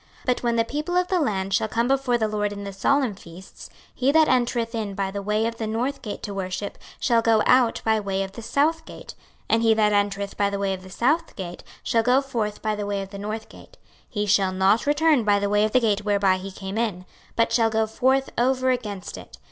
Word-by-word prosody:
26:046:009 - - -25
But 250 -2 +1
when 235 -1 0
the 230 - +3
people 305 +7 -2
of 360 0 +2
the 370 - +2
land 195 - -1
shall 215 - +2
come 230 +2 0
before 265 -2 +1
the 220 -2 0
LORD 210 -1 -1
in 200 0 -6
the 200 0 -6
solemn 260 +4 +1
feasts, 185 0 -13 0.2
he 265 +2 +1
that 315 +1 +5
entereth 240 -2 +1
in 215 -4 -3
by 195 -1 -2
the 200 0 -4
way 210 +2 0
of 230 0 -3
the 220 - -2
north 245 +6 -2
gate 210 - -6
to 205 - -4
worship 190 +1 -4 0.2
shall 235 -2 +3
go 225 -1 +3
out 250 -2 +4
by 220 0 +3
the - - -2
way 195 -1 -1
of 190 - -7
the 230 - -9
south 305 +8 0
gate; - - -10 0.3
and 225 - +2
he 225 -1 +4
that 210 -1 +3
entereth 200 -1 0
by 200 -1 +2
the 200 - -3
way 195 -1 -1
of 185 - -6
the 185 - -12
south 295 - 0
gate 175 -3 -7 0.2
shall 230 - +2
go 250 +3 +4
forth 230 -7 -3
by 215 -1 0
the 205 -1 -4
way 200 -1 -2
of 195 - -11
the 200 - -8
north 215 +2 -5
gate: - - -16 0.3
he 210 -3 -2
shall 195 -2 +3
not 190 +6 +2
return 295 -3 +3
by 205 -1 +3
the 200 0 -1
way 210 0 +3
of 215 - -2
the 255 - +4
gate 210 -3 +1
whereby 200 -2 +2
he 195 +1 -7
came 195 +2 -5
in, 195 -6 -2 0.3
but 230 - +2
shall 225 -2 +3
go 220 0 +1
forth 265 +4 +1
over 260 +1 +2
against 210 -7 -4
it. - - -13
215 Hz, 250 wpm, -24 LUFS, 200-245 Hz, 0.3 s, that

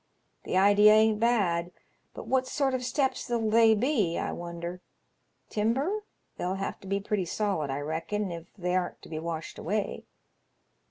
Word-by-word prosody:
The - - 0
idea 205 +2 +7
ain't 215 0 +4
bad; 185 -7 +1 0.4
but - - -7
what 260 -1 +1
sort 275 -2 0
of 255 -1 -1
steps 265 0 -1
'11 225 -3 0
they 225 0 +6
be, 215 - +1
I - - -2
wonder? 170 +1 -6 0.7
Timber? 275 - 0 0.3
They'll 180 +2 -2
have 195 0 -4
to 195 - -12
be 195 +1 0
pretty 200 -1 -1
solid, 175 -5 -1
I 135 +1 -2
reckon, 165 +6 -2
if 170 0 -7
they 180 -1 -1
arn't 180 -1 -2
to - - -12
be 155 -1 -4
washed 165 -1 -5
away. 205 +4 -2
205 Hz, 165 wpm, -28 LUFS, 175-230 Hz, 0.7 s, idea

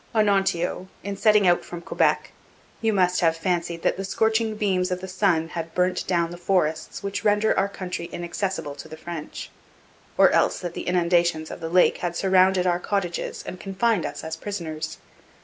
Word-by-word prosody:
'Onontio, 195 -4 +1 0.2
in 200 0 -4
setting 210 0 +4
out 175 -1 +4
from 175 - -7
Quebec, - - +1 0.5
you 225 -1 +2
must 180 -3 +2
have 165 -1 +2
fancied 170 -1 -2
that - - +1
the 195 - -3
scorching 220 +2 +1
beams 190 -4 0
of 180 0 -2
the 190 - -7
sun 185 -4 +1
had 165 -1 -6
burnt 180 0 +1
down 170 -2 +1
the 175 - -7
forests 175 0 0
which 200 0 -3
render 210 +1 +3
our 195 +1 +1
country 180 -3 -5
inaccessible 175 -3 -3
to 140 - -10
the 155 - -10
French; 160 -2 -7 0.7
or - - +6
else - - +3
that 175 -1 -5
the - - -6
inundations 170 -2 +2
of - - -7
the 165 -1 -4
lake 180 +1 +4
had 175 -1 -3
surrounded 185 0 +3
our 175 -1 +2
cottages 180 -2 -2
and 185 - -7
confined 195 +1 0
us - - -5
as 160 0 -4
prisoners. 165 -4 -5
180 Hz, 185 wpm, -24 LUFS, 170-195 Hz, 0.7 s, or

